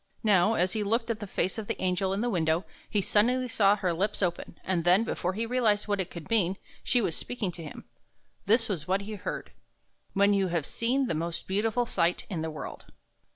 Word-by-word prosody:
Now, 210 0 +4
as 180 +1 +1
he 220 - 0
looked 230 +3 +1
at 220 - -3
the 205 - -6
face 190 +2 -1
of 210 - -6
the - - -3
angel 185 +1 0
in 195 +2 -1
the 245 - 0
window, 165 -1 +1 0.2
he 205 - +1
suddenly 250 +6 +2
saw 205 -4 +4
her 185 -4 -1
lips 200 +4 -1
open; 175 -1 -3
and 180 -3 0
then, 180 +5 +5
before 185 -5 -2
he 225 +4 -2
realized 225 -4 +1
what 205 -1 0
it 185 - -2
could 170 -3 -9
mean, 195 -4 +2 0.3
she 245 - +3
was 170 -6 0
speaking 230 -7 -2
to 170 -1 -9
him. 150 - -9 0.6
This 225 +2 +4
was 170 -8 -3
what 190 +2 +1
he 210 +2 -6
heard: 200 - -5 0.3
" - - -43
When 200 +1 +5
you 195 -1 +2
have 170 -4 -1
seen 255 - 0
the 235 - -1
most 165 +2 -3
beautiful 220 +5 +1
sight 175 -5 0
in 170 -4 -2
the 160 - -2
world." 155 -2 -7
200 Hz, 225 wpm, -28 LUFS, 175-220 Hz, 0.6 s, then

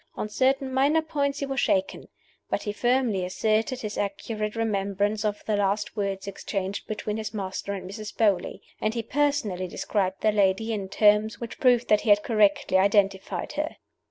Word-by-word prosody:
On - - -3
certain 265 +3 +1
minor 290 +5 +3
points 285 -2 -1
he - - 0
was 270 0 -2
shaken. 290 -2 0 0.4
But - - -1
he 205 - -3
firmly 240 -4 +1
asserted 215 +6 0
his 215 -1 -4
accurate 210 +2 -3
remembrance 205 -1 0
of 210 -1 -2
the 215 - +1
last 205 +1 0
words 195 -2 -3
exchanged 195 0 -4
between 215 0 -3
his 220 0 -5
master 195 0 -4
and 185 -2 -6
Mrs. 210 +2 -7
Beauly; 200 -5 +1 0.2
and 215 +2 -1
he 230 - -2
personally 255 -8 0
described 190 +1 -2
the 215 - +3
lady 205 +2 +2
in 195 -3 -4
terms 210 +2 +3
which 235 -1 -7
proved 245 -2 +4
that 210 -1 +5
he 225 - -2
had 205 0 +5
corruptly 205 -4 +3
identified 195 -1 +1
her. 300 +1 -3
210 Hz, 175 wpm, -26 LUFS, 200-235 Hz, 0.4 s, that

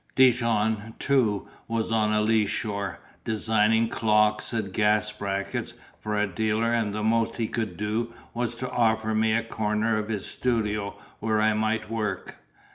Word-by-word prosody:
Dijon, 115 -3 +3
too, 120 -8 +1 0.2
was 115 -1 -1
on 110 -1 +2
a 105 0 +2
leeshore, 105 -2 0 0.2
designing 110 +1 +2
clocks 105 -1 +2
and 110 -5 -3
gas 105 +1 +2
brackets 100 -2 -3 0.2
for 105 0 -2
a 105 - +3
dealer; 110 +4 0
and 115 -3 +1
the 105 +1 -3
most 115 +1 +1
he 115 -2 0
could 110 -7 -3
do 110 +3 -1 0.2
was 120 0 -2
to 130 +2 -5
offer 110 -2 +2
me 110 0 +2
a 115 - +1
corner 110 0 0
of 105 0 -4
his 105 -3 -2
studio 105 -4 -1 0.2
where 110 -1 +1
I 110 0 +3
might 110 0 -1
work. 105 -4 -3
110 Hz, 155 wpm, -26 LUFS, 105-115 Hz, 0.2 s, Dijon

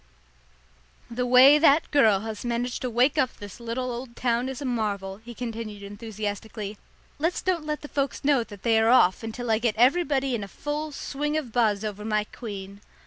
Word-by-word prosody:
"The 250 +1 -1
way 260 +4 +8
that 300 0 +4
girl 220 -9 +4
has 220 -1 -6
managed 240 +1 -2
to 255 - -2
wake 255 +6 +2
up 255 -3 0
this 205 0 -10
little 240 +2 -3
old 240 0 -7
town 245 +1 0
is 265 - -6
a 285 - -5
marvel," 205 -6 -2
he 235 +2 -11
continued 225 -4 -6
enthusiastically. 210 0 -6 0.4
"Let's 330 +4 -1
don't 345 -5 -1
let 300 0 -2
the 295 - -8
folks 280 -1 -2
know 275 -4 +4
that 205 -3 -12
they 225 -2 +4
are 225 +1 +3
off 190 -7 +5
until 225 +1 -4
I 220 - +3
get 230 -2 0
everybody 275 +1 +3
in 225 -4 -2
a - - -6
full 295 +7 -4
swing 295 +2 -3
of 275 -7 -4
buzz 220 -3 +1
over 210 -1 -5
my 215 -1 0
queen." 200 -3 -8
235 Hz, 195 wpm, -26 LUFS, 215-265 Hz, 0.4 s, way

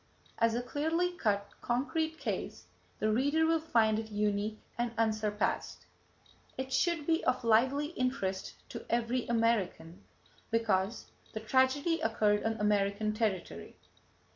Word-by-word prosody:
As 230 0 +3
a 245 - -1
clearly 320 +7 0
cut, 205 - 0
concrete 315 +6 -1
case, 215 - -4 0.3
the 215 - +1
reader 285 +8 +2
will 325 0 +3
find 225 -8 +2
it 220 0 -6
unique 210 0 -1 0.2
and 240 -1 -1
unsurpassed. 215 -2 -1 0.7
It 265 0 -4
should 340 -4 +1
be 325 +1 +1
of 255 0 +1
lively 260 +6 +3
interest 250 - -2
to - - -7
every 240 +1 0
American 205 -6 0 0.5
because 220 -2 0 0.2
the 220 - -3
tragedy 265 +8 +2
occurred 210 -2 +2
on 225 - +1
American 210 0 +1
territory. 215 -4 -3
230 Hz, 125 wpm, -32 LUFS, 210-270 Hz, 0.7 s, As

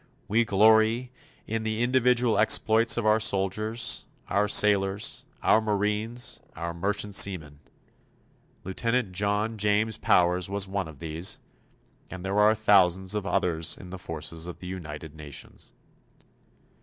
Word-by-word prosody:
We 115 +3 +2
glory 110 +4 +3 0.3
in 115 +1 -3
the 110 +1 -2
individual 125 -2 +2
exploits 110 +1 +3
of 120 - -1
our 110 +1 +4
soldiers, 110 +3 0 0.2
our 100 +1 +1
sailors, 100 -1 +2 0.2
our 110 - +4
marines, 105 +3 -2 0.2
our 85 +1 -5
merchant 100 +4 -2
seamen. 80 -8 +1 1.0
Lieutenant 115 +3 -1
John 105 +3 -1
James 105 +1 +1
Powers 90 +1 +2
was 100 0 -1
one 95 -2 -3
of 80 -3 -12
these 80 +3 -4 0.7
and 95 0 -8
there 100 +2 0
are 105 +1 +5
thousands 95 -3 +3
of 105 -2 -3
others 85 -5 0
in 90 - -12
the 95 - -7
forces 80 0 -5
of 90 - -7
the - - -11
United 80 -4 -7
Nations. 75 -3 -9
100 Hz, 130 wpm, -26 LUFS, 90-110 Hz, 1.0 s, are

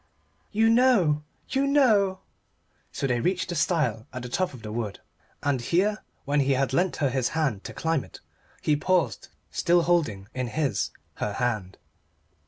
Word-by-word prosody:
"You 220 +1 +3
know 225 - +4 0.3
you 275 +1 +1
know!" 215 -10 +3 0.7
So - - -3
they 125 -3 +1
reached 180 +6 0
the 175 - -2
stile 150 - 0
at 125 -1 -6
the 125 - -6
top 185 +7 0
of 125 -6 -12
the 105 - -6
wood 110 -3 -4 0.4
and 140 -3 +1
here, 200 - +1 0.3
when 145 +1 +1
he 140 0 +3
had 135 0 0
lent 180 +6 +2
her 140 -4 0
his 130 -2 0
hand 135 -11 0
to - - -6
climb 160 -3 0
it, - - -13 0.4
he 150 - +3
paused, 150 - 0 0.2
still 175 0 +3
holding 145 - +1
in 130 -1 -2
his 135 -3 -1 0.3
her 105 - -2
hand. 105 -6 -2
145 Hz, 170 wpm, -26 LUFS, 125-185 Hz, 0.7 s, know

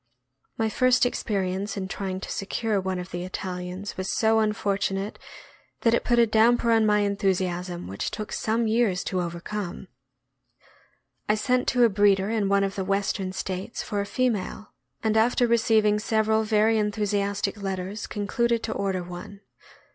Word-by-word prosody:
My 225 - +1
first 250 +3 +3
experience 200 -3 -2
in 190 -1 -3
trying 190 -1 -4
to - - -6
secure 205 +1 -1
one 190 0 -2
of 180 +1 -6
the 175 0 -4
Italians 185 +1 -5
was 185 0 -2
so 220 0 +3
unfortunate 200 -2 -1 0.6
that 230 - +3
it - - +2
put 240 - +2
a 235 - +6
damper 230 +2 +3
on 225 -1 +4
my 210 0 +3
enthusiasm 185 -3 -1
which 95 - -3
took 215 -1 -6
some 225 +1 0
years 220 -4 +1
to 185 -1 -1
overcome. 175 +2 -5 1.4
I 210 - +4
sent 250 +3 +1
to 245 -1 +3
a 235 - +6
breeder 200 0 +3
in 210 -3 0
one 200 0 +3
of 195 0 -1
the 195 - -3
Western 195 -1 -1
States 190 +3 -4
for 205 -2 -2
a 200 - -4
female, 215 -4 -2 0.3
and 220 -1 +1
after 240 +2 +3
receiving 220 -2 +3
several 220 0 +2
very 220 +1 +3
enthusiastic 205 -1 -1
letters 195 +1 -4
concluded 230 +3 0
to 220 - -2
order 190 -3 -1
one. 180 +3 -9
205 Hz, 160 wpm, -26 LUFS, 190-220 Hz, 1.4 s, a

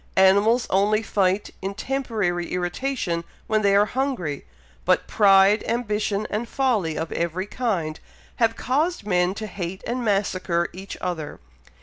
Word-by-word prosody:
Animals 200 +5 +5
only 210 +3 +3
fight 195 -1 0
in 195 +1 -4
temporary 215 -10 -1
irritation 180 0 -2 0.2
when 215 -1 +1
they 200 -1 +3
are 205 +1 +5
hungry, 230 - -2 0.4
but - - +2
pride, 200 0 +5
ambition, 215 -3 -1
and 225 +3 -2
folly 220 - 0
of 160 0 -3
every 170 +3 -2
kind, 200 -9 -2 0.4
have 225 -1 +2
caused 300 - 0
men 180 -1 +1
to 215 - -5
hate 190 -2 -6
and 245 +1 -2
massacre 185 -5 0
each 190 +2 -8
other. 165 -5 -4
200 Hz, 135 wpm, -24 LUFS, 180-225 Hz, 0.4 s, Animals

